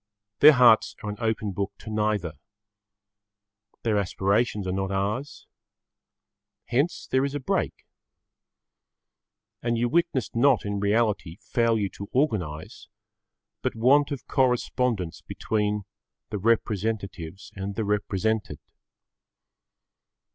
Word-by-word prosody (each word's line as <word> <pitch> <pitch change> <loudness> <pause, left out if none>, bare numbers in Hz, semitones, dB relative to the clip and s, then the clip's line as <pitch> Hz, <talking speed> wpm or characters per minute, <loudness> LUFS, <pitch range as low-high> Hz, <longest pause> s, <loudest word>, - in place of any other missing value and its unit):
Their 150 +1 +9
hearts 125 -4 +5
are 105 - -3
an 105 - -7
open 110 -3 -1
book 100 +1 -3
to 110 - -9
neither. 105 -6 0 1.5
Their 110 -3 +2
aspirations 100 +2 0
are 95 - -1
not 95 +1 -2
ours. 105 +8 -3 1.2
Hence 140 +8 0
there 130 0 +3
is 140 +1 -2
a - - -1
break. 130 - -2 1.8
And 120 0 0
you 120 +1 +1
witness 170 -3 0
not 125 0 +3
in 100 0 -2
reality 100 -4 0
failure 115 -3 +1
to 100 +3 -9
organise 95 - -2 0.7
but - - -2
want 135 +6 +4
of 140 -4 -5
correspondence 125 - 0
between 105 -1 -2 0.5
the 105 - -2
representatives 100 -4 -1
and 100 0 -5
the 110 - -1
represented. 105 -3 -1
110 Hz, 110 wpm, -26 LUFS, 100-120 Hz, 1.8 s, Their